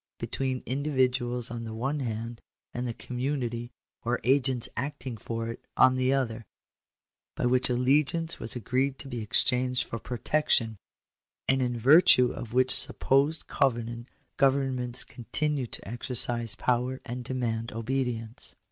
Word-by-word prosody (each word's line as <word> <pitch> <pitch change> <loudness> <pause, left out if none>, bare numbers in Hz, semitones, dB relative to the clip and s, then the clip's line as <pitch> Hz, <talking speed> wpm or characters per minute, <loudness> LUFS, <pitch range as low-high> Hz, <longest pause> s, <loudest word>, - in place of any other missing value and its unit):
201 - - -5
between 130 -1 -2
individuals 130 -3 0
on 120 -1 -5
the 110 -1 -6
one 135 +6 -2
hand, 115 -2 -4 0.3
and 125 +1 -3
the 120 - -3
community, 125 -2 -3 0.3
or 120 +2 -1
agents 130 -2 +2
acting 135 -2 -4
for 115 +1 -4
it, 115 - -8
on 130 0 +6
the 130 0 +1
other, 120 -4 -1 0.9
by - - -1
which 125 +1 +3
allegiance 145 +7 +1
was 110 - +1
agreed 130 +3 -1
to 135 - -10
be 120 -3 -5
exchanged 125 +3 +2
for 115 - -6
protection; 120 -2 0 0.7
and 130 0 +2
in 120 -1 -1
virtue 125 0 +6
of 115 - -7
which 130 +1 +3
supposed 140 +4 +4
covenant 120 -2 -1 0.3
governments 130 -3 +2
continue 135 +3 -2
to - - -8
exercise 120 -1 -1
power 125 +1 0
and 125 +1 -5
demand 115 -3 -3
obedience. 115 -1 -3
125 Hz, 140 wpm, -28 LUFS, 120-135 Hz, 0.9 s, on